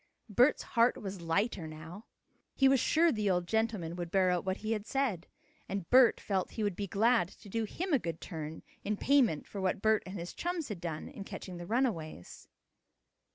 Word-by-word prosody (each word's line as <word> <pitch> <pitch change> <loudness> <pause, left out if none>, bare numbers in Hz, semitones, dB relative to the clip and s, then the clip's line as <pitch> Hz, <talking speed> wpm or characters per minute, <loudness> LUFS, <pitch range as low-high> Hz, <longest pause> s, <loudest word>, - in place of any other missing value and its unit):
Bert's 245 +7 +4
heart 235 0 +3
was 195 -3 -6
lighter 170 +1 0
now. 160 +7 -9 0.5
He 270 - +5
was 265 -1 +5
sure 330 +7 +4
the 215 -5 0
old 180 -1 +1
gentleman 220 -7 -1
would 175 -1 -4
bear 185 0 +3
out 180 -1 0
what 190 +1 -1
he 220 - 0
had 215 -1 -2
said, 250 - -1 0.4
and 195 -3 -3
Bert 255 -2 +7
felt 190 -3 -2
he 220 - -2
would 205 -3 0
be 200 +1 -3
glad 220 0 +3
to - - -16
do 225 +3 -1
him 350 - -3
a 275 - +5
good 165 -5 -4
turn 160 -3 -6 0.2
in 210 - -1
part - - -9
payment 255 - +4
for 200 - -6
what 190 0 0
Bert 220 -1 +4
and 190 +2 -6
his 175 0 -6
chums 345 -4 -3
had 195 -5 -5
done 165 -3 -4
in 250 -7 -8
catching 185 -2 -7
the 175 0 -7
runaways. 195 - -2
200 Hz, 205 wpm, -32 LUFS, 175-235 Hz, 0.5 s, Bert